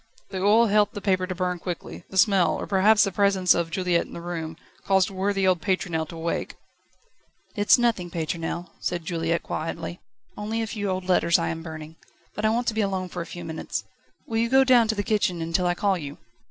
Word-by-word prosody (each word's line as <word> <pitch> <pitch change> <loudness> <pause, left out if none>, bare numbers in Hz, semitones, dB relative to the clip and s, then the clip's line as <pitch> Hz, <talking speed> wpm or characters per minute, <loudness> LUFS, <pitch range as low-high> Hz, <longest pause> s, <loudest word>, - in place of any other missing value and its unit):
The 190 - -3
oil 215 +4 +5
helped 210 -1 +2
the - - -3
paper 185 -2 +1
to 185 - -4
burn 180 -1 -2
quickly; 175 -1 -6
the 190 - -6
smell, 190 -1 +4
or - - -4
perhaps 205 +2 +4
the 195 - 0
presence 195 -1 +3
of 170 -1 -1
Juliette 180 0 0
in - - -13
the - - -6
room 165 -2 -5 0.3
caused 190 0 +2
worthy 195 0 0
old 185 -3 +2
Pétronelle 175 -5 -1
to 165 - -9
wake. 165 +1 -3 1.0
"It's 205 +2 +5
nothing, 230 -8 0
Pétronelle," 165 +1 -4
said 175 -2 -3
Juliette 165 0 -1
quietly; 165 +2 -4 0.4
"only 220 +2 -2
a - - -1
few 205 -2 -3
old 185 0 -3
letters 170 -2 +4
I 170 - -1
am 165 0 -4
burning. 160 -1 -9 0.4
But 210 - -3
I - - +4
want 235 +2 0
to - - -3
be 220 - 0
alone 190 -2 -2
for 180 - -5
a 170 - -6
few 175 -1 -8
moments 160 -1 -4 0.4
will 225 - -3
you 230 +1 +1
go 265 +1 +6
down 250 -3 +5
to 220 - 0
the 205 - -1
kitchen 200 -5 0
until 165 +2 0
I 175 - +1
call 195 -1 +1
you?" 145 -2 -7
185 Hz, 220 wpm, -25 LUFS, 170-205 Hz, 1.0 s, go